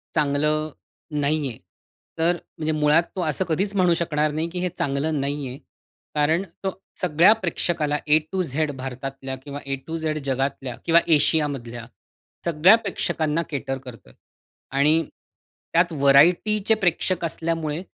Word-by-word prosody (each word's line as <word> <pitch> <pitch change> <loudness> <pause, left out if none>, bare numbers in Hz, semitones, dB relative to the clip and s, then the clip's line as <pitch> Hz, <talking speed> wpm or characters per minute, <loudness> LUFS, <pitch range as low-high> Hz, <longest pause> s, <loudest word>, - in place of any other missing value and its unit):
चांगलं 150 +1 +1 0.5
नाही 145 0 +1
आहे. 115 - -8 0.6
तर 165 +2 +3 0.3
म्हणजे 155 0 -1
मुळात 155 +2 +3
तो 185 - -2
असं 155 +4 -1
कधीच 190 +5 -1
म्हणू 180 -3 +4
शकणार 155 -3 0
नाही 160 +3 -2
की 180 +1 -5
हे 180 0 -1
चांगलं 145 +2 -1
नाही 140 0 -2
आहे. 125 +1 -7 0.6
कारण 155 +5 +2 0.2
तो 190 - 0 0.3
सगळ्या 175 +2 +5
प्रेक्षकाला 165 -4 0
ए 150 +1 +6
टू 190 - 0
झेड 155 -2 -1
भारतातल्या 135 +1 -5
किंवा 145 0 -6
ए 135 0 -1
टू 165 0 -3
झेड 155 -1 -2
जगातल्या 135 -1 -2
किंवा 165 0 +6 0.2
एशिया 150 +1 +3
मधल्या, 120 -4 -6 0.6
सगळ्या 170 +5 +6
प्रेक्षकांना 165 -7 -1
केटर 135 -2 -3
करतोय. 125 -4 -12 0.6
आणि 150 +4 +3 0.7
त्यात 170 +1 +3
व्हरायटीचे 170 +10 +4
प्रेक्षक 175 0 +1
असल्यामुळे, 165 -1 -2
155 Hz, 140 wpm, -23 LUFS, 140-170 Hz, 0.7 s, ए